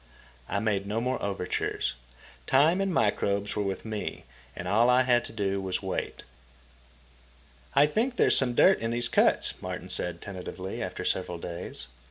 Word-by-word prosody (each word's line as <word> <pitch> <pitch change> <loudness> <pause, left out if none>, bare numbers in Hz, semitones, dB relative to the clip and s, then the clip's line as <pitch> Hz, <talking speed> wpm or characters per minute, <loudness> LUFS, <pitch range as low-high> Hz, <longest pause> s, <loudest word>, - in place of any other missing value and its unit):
I - - -1
made 100 -2 0
no 105 +2 -1
more 125 +2 -1
overtures. 100 -3 -2 0.5
Time 155 +8 +4
and 195 -1 0
microbes 100 - +1
were 105 - 0
with 95 0 -3
me, 110 -2 -4 0.3
and - - -6
all 115 +4 +4
I 125 +1 +5
had 120 -1 +3
to - - -8
do 100 -3 -1
was 95 0 -2
wait. 95 -1 -4 1.5
"I 140 +2 +7
think 230 - 0
there's - - +4
some 125 -3 +3
dirt 190 +8 +6
in 115 - -2
these 120 +1 0
cuts," - - +3
Martin - - -6
said 90 -1 -1
tentatively, 95 0 -6
after - - -4
several 90 -2 -1
days. 85 -4 -5
105 Hz, 165 wpm, -28 LUFS, 95-125 Hz, 1.5 s, I